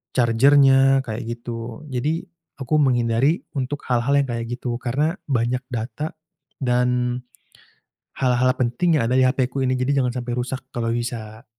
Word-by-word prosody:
charger-nya 135 +2 +5
kayak 115 0 -5
gitu. 115 +2 -6
Jadi 150 +6 -1 0.3
aku 140 +3 0
menghindari 125 +2 +2
untuk 140 0 -3
hal-hal 125 +3 +2
yang 140 -1 +2
kayak 115 0 -3
gitu, 120 0 -4
karena 145 +8 -1
banyak 125 -2 0
data 130 +6 -4 0.5
dan 125 0 +1 1.0
hal-hal 130 0 +3
penting 135 +6 +1
yang 115 - 0
ada 125 - +2
di 130 - +5
HP 130 0 +1
ku 135 +1 -3
ini, 130 - +1
jadi 135 +2 +1
jangan 125 - 0
sampai 120 -1 -4
rusak 130 +1 -3
kalau 115 -1 -1
bisa. 115 -2 -5
125 Hz, 150 wpm, -22 LUFS, 120-135 Hz, 1.0 s, charger-nya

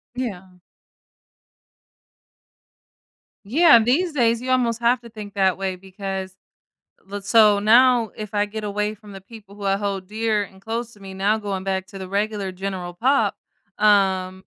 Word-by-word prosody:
Yeah. 190 -7 -6 2.9
Yeah, 290 - +6
these 295 +10 +1
days, 235 -4 +2
you 255 +1 -3
almost 235 -3 +1
have 240 +1 +2
to 235 - -12
think 210 -2 -9
that 190 -2 +2
way 190 -1 -3
because 190 0 -6 0.7
let 200 0 -6
so, 210 -1 +5
now, 235 +2 +4
if 215 -1 -8
I 205 0 +1
get 215 +1 -7
away 210 +1 -2
from 210 -1 -15
the 195 - -10
people 200 -1 -14
who 205 - -10
I 195 0 +1
hold 200 -2 -3
dear 215 0 0
and 190 -1 -14
close 230 +2 -4
to 205 - -19
me, 195 -1 -10
now 200 +3 +1
going 200 -3 -4
back 190 -1 -2
to 195 - -10
the 190 -1 -7
regular 200 -1 -2
general 185 -1 -5
pop, 265 +9 +1 0.4
um 190 -3 +2
205 Hz, 160 wpm, -22 LUFS, 195-230 Hz, 2.9 s, Yeah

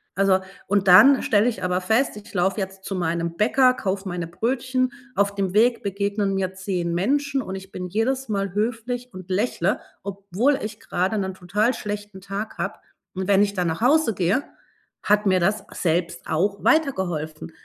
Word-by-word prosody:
Also 195 -1 +3 0.3
und 200 -1 +1
dann 265 +9 +8
stelle 210 +2 +3
ich 225 -6 -2
aber 180 0 +1
fest, 220 +5 +1
ich 210 +2 -12
laufe 190 +3 +1
jetzt 190 0 -5
zu 195 - -3
meinem 170 -1 -2
Bäcker, 255 +4 +4
kaufe 195 -3 -3
meine 175 -1 -3
Brötchen. 255 +7 -1 0.2
Auf 200 0 +1
dem 195 -2 -1
Weg 230 +3 +3
begegnen 200 0 -1
mir 185 -1 -1
10 185 -3 -2
Menschen 275 - +1
und 190 - -6
ich 190 0 -9
bin 180 - -5
jedes 255 +7 -1
Mal 195 -3 -1
höflich 240 +3 -2
und 185 0 -10
lächele, 205 +6 0 0.2
obwohl 200 +7 0
ich 215 0 -6
gerade 185 +5 -1
'nen 190 -1 -3
total 210 +7 0
schlechten 205 -1 -6
Tag 200 +3 -5
habe. - - -3 0.4
Und 190 0 -3
wenn 200 0 +5
ich 200 -1 -1
dann 180 -3 -1
nach 160 +6 -4
Hause 285 0 +4
gehe, 190 +10 +1 0.6
hat 210 +1 +3
mir 185 -1 +4
das 200 +4 +1
selbst 170 0 -1
auch 195 +5 0
weitergeholfen, 175 - 0
200 Hz, 175 wpm, -23 LUFS, 185-225 Hz, 0.6 s, dann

